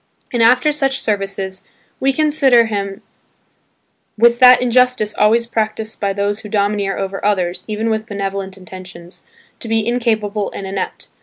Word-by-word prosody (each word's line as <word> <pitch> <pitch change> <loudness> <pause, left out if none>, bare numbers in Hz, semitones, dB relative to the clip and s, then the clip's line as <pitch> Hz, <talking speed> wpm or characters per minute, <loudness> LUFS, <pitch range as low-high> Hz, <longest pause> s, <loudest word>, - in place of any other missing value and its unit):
And 240 - +1
after 250 +6 +4
such 275 -2 0
services, 195 -3 -3 0.4
we 270 - +2
consider 275 -5 +4
him 200 -2 -4 1.1
with 235 +2 +4
that 255 -1 +8
injustice 250 -3 +2
always 225 +3 +2
practiced 220 -1 -3
by 200 -1 0
those 200 +1 -1
who 210 - -10
domineer 200 -1 0
over 195 0 -4
others 185 -4 0
even 215 +1 -2
with 220 0 -2
benevolent 195 -2 -4
intentions, 185 -1 -11 0.4
to - - -7
be 225 -1 0
incapable 220 -4 -1
and 195 - -6
inept. 190 0 -5
215 Hz, 145 wpm, -17 LUFS, 195-235 Hz, 1.1 s, that